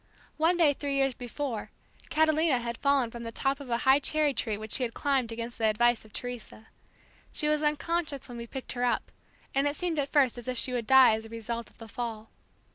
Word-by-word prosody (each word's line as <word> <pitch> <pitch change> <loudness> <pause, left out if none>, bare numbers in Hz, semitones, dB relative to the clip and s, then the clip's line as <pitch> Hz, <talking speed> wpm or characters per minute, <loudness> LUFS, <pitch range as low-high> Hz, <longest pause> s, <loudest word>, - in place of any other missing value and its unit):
One 330 +3 +3
day 315 -4 +5
three 280 0 -3
years 270 -1 +2
before, 245 -2 -4 0.4
Catalina 315 -2 +3
had 235 -1 -4
fallen 280 -4 +2
from 235 - -8
the 230 -1 -5
top 270 +4 0
of 280 -3 -9
a 235 - +1
high 265 +1 +6
cherry 300 0 +1
tree 220 -3 -1
which 215 0 -8
she - - 0
had 235 -2 -2
climbed 270 -5 0
against 230 +1 -6
the 220 - +3
advice 240 +2 +3
of 215 - -17
Teresa. 245 -2 -7 0.6
She 300 - 0
was 300 0 +2
unconscious 300 -1 -1
when 240 -2 -8
we 235 - -6
picked 265 +2 -7
her 245 -1 -3
up, 245 - 0 0.4
and 275 +1 +2
it 290 - -1
seemed 340 -3 -1
at 280 -1 -2
first 265 -5 +3
as 240 - -10
if 255 -1 -2
she 255 - 0
would 235 -3 -2
die 265 -3 +8
as 220 +1 -3
a - - -16
result 230 +1 -5
of - - -25
the 225 - -10
fall. 225 0 -5
255 Hz, 230 wpm, -29 LUFS, 230-285 Hz, 0.6 s, die